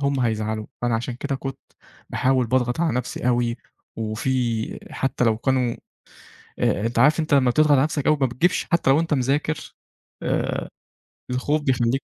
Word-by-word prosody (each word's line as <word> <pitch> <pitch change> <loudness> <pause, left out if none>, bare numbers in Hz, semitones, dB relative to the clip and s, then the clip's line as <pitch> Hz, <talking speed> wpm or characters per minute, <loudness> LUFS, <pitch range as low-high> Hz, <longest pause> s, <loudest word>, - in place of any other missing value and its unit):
هُم 140 -1 0
هيزعلوا، 110 -2 -1 0.2
فأنا 120 -1 +1
عشان 120 +2 -2
كده 140 +2 -3
كنت 135 0 -5 0.5
باحاول 130 -2 +2
باضغط 125 +4 0
على 165 -2 +1
نفسي 125 0 -2
أوي، 120 -1 +1 0.4
وفي 115 +1 -1
حتَّى 135 -2 -1
لو 110 -1 +3
كانوا 125 -1 +1 0.8
آآ 105 +3 +1
أنت 115 0 -2
عارف 150 +6 +5
أنت 155 -2 +1
لمّا 130 -3 +4
بتضغط 150 +4 +3
على 135 -2 +6
نفسك 150 -1 -1
أوي 155 - +4
ما 135 - +4
بتجيبش 145 +9 +1
حتى 170 -5 +3
لو 145 - +5
أنت 165 -2 0
مذاكر، 140 +4 -1 0.5
آآ - - -1 0.6
الخوف 145 +4 0
بيخلّيك 130 -1 +1
130 Hz, 165 wpm, -23 LUFS, 120-140 Hz, 0.8 s, على